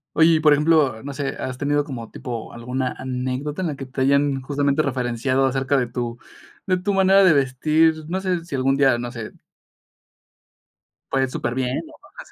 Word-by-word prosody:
Oye, 160 - +6
y 160 - +3
por 155 -1 +5
ejemplo, 145 -6 +3
no 140 0 -6
sé, 140 0 -4
¿has 130 -1 -4
tenido 145 +1 0
como 120 -6 -7
tipo 120 -3 -6
alguna 125 +2 -3
anécdota 130 +4 -3
en 175 - -1
la 150 - -4
que 135 - -6
te 130 +1 -5
hayan 140 0 +2
justamente 140 +2 0
referenciado 130 -1 0
acerca 135 +1 +1
de 125 -2 0
tu 120 0 -4 0.5
de 185 - +3
tu 195 +3 -1
manera 195 0 +5
de 185 - +6
vestir? 155 +3 +2
No 185 +2 -1
sé, 185 -3 -1
si 170 - -11
algún 135 +1 +1
día, 135 -3 +3
no 120 0 -4
sé 115 -4 -7 1.8
Pues, 135 -1 +1
superbién, 125 +1 -2
¿no? 320 - -14 0.3
Así. - - -17
135 Hz, 185 wpm, -22 LUFS, 130-155 Hz, 1.8 s, Oye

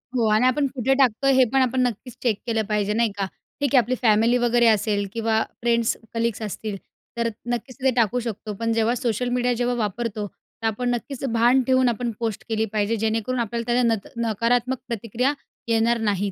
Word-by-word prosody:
हो. 235 -3 +2
आणि 215 +4 +4
आपण 275 +2 +2
कुठे 260 +1 +2
टाकतोय, 270 0 +3
हे 260 -1 +5
पण 270 - +4
आपण 255 0 +1
नक्कीच 245 0 -2
चेक 225 -5 +1
केलं 225 -1 +1
पाहिजे. 210 -1 0
नाही 230 0 +1
का? 200 - 0 0.3
ठीक 285 -2 +1
आहे 255 - +8
आपली 250 +3 -2
फॅमिली 225 +1 +4
वगैरे 240 -1 +3
असेल 205 -2 +2
किंवा 225 -1 +1 0.2
फ्रेंड्स, 235 -1 +2 0.2
कलीग्स 230 -1 -1
असतील. 215 0 -4 0.4
तर 235 0 +1 0.2
नक्कीच 240 +2 -5
ते 265 - +4
टाकू 240 0 +2
शकतो. 220 -3 -5
पण 230 0 0
जेव्हा 225 +1 +2
सोशल 245 -1 -1
मीडिया 245 0 +1
जेव्हा 245 0 +1
वापरतो, 215 -1 -2
तर 225 +3 -8
आपण 245 +3 -1
नक्कीच 265 +3 -7
भान 240 +3 +4
ठेऊन 260 -1 +4
आपण 235 +1 -2
पोस्ट 225 -3 -3
केली 220 0 +1
पाहिजे, 215 +1 +1
जेणेकरून 225 +3 -1
आपल्याला 235 0 -2
त्याला 250 +1 +3
नत 210 -3 -5 0.2
नकारात्मक 240 +4 +1
प्रतिक्रिया 235 +4 -1 0.3
येणार 230 +1 +2
नाहीत. 205 -2 0
230 Hz, 190 wpm, -23 LUFS, 220-245 Hz, 0.4 s, आहे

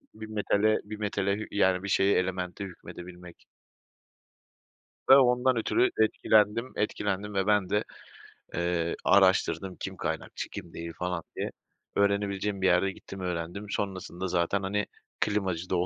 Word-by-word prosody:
Bir 110 0 -8
metale, 110 0 +2
bir 105 +1 -7
metale, 100 0 -1
yani, 95 -2 +2
bir 100 - -4
şeye, 100 +1 +4
elemente 90 +1 -3
hükmedebilmek. 90 -1 -11 1.6
Ve 135 - +10
ondan 125 -1 +4
ötürü 360 - +2
etkilendim, 110 +2 +3
etkilendim 105 -1 -2
ve 95 0 +1
ben 105 -3 +2
de, 105 0 +1 0.7
eee, 85 -1 0
araştırdım. 95 -1 +3
Kim - - -5
kaynakçı, - - -4
kim 85 - -8
değil 85 0 -6
falan 90 -2 -3
diye. - - -3 0.4
Öğrenebileceğim 100 0 +1
bir 95 - +4
yerde, 90 +2 +3
gittim 95 0 -10
öğrendim, 90 +2 -4
sonrasında 95 -2 -3
zaten, 90 +3 0
hani, 105 +2 0 0.3
klimacı 95 -4 -1
da - - +1
oldum. 90 0 +2
100 Hz, 135 wpm, -28 LUFS, 90-105 Hz, 1.6 s, Ve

